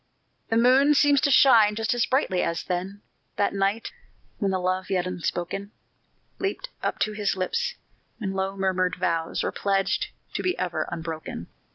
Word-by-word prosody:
The 225 - +2
moon 265 +5 +5
seems 285 -1 +4
to - - +2
shine 225 -7 +6
just 225 +1 0
as 240 -1 +1
brightly 255 -9 +1
as 170 - -1
then, 190 +3 -4 0.3
That 200 - +1
night, 200 +3 0 0.5
when 200 - +1
the 190 - +1
love 185 +1 -1
yet 185 -2 +1
unspoken 180 +2 -3 0.7
Leaped 400 +6 -3
up - - -1
to 215 - +2
his 210 -2 -1
lips 470 - -1 0.4
when 195 -4 -3
low 195 +1 -2
murmured 185 -1 +1
vows 165 -1 -1
Were - - -1
pledged 195 -1 0 0.3
to - - -2
be 365 0 0
ever 180 -2 -2
unbroken. 160 - -5
195 Hz, 165 wpm, -25 LUFS, 185-230 Hz, 0.7 s, shine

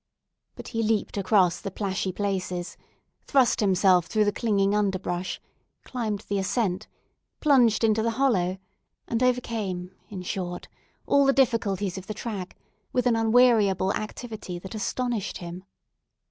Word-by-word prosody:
But - - -9
he 230 -2 -1
leaped 220 -2 0
across 190 -3 +2
the - - -4
plashy 190 -1 -2
places, 185 -2 -3 0.5
thrust 265 -4 +3
himself 185 -3 +4
through 215 -1 +2
the 205 - +2
clinging 200 -3 +1
underbrush, 185 -3 -1 0.4
climbed 220 -5 -3
the 200 -2 -2
ascent, 190 -1 -1 0.5
plunged 245 -8 +4
into 220 -1 +3
the 230 - +1
hollow, 190 -9 +2 0.5
and 230 +1 -1
overcame, 220 -8 -1 0.2
in 190 -3 -6
short, 175 -1 -4 0.4
all 280 -1 +4
the 275 - +5
difficulties 205 -8 +1
of 190 - -13
the 215 - -5
track, 205 -5 -6 0.3
with 250 -1 0
an 245 -2 +3
unweariable 225 -5 +4
activity 215 -4 -5
that 190 +4 -9
astonished 230 -1 -2
him. 175 +1 -8
205 Hz, 135 wpm, -26 LUFS, 185-230 Hz, 0.5 s, the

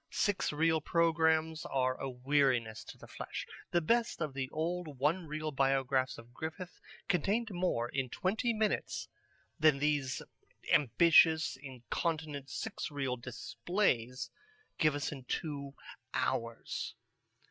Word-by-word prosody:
Six 205 -2 +1
reel 160 +1 +2
programmes 160 -1 +2
are 130 -1 +1
a 135 - -2
weariness 125 -4 +1
to - - -10
the - - -12
flesh. - - -6 0.2
The 175 - +2
best 230 +8 +1
of 155 -4 -2
the 130 -1 -3
old 160 -1 -3
one 160 +6 +1
reel 155 +1 -3
Biographs 135 -1 +1
of 120 +1 -13
Griffith 160 +5 -6 0.3
contained 205 +6 +1
more 175 -10 0
in 130 0 -2
twenty 220 - 0
minutes 215 -1 -1 0.5
than 155 -2 +5
these 145 -2 0 0.5
ambitious 160 +3 +5
incontinent 140 +2 -3
six - - -4
reel 135 -4 -1
displays 125 - -1 0.5
give 155 -2 +4
us 145 - -2
in 135 -3 -7
two 140 0 -3 0.4
hours. 115 0 -2
150 Hz, 125 wpm, -33 LUFS, 130-165 Hz, 0.5 s, than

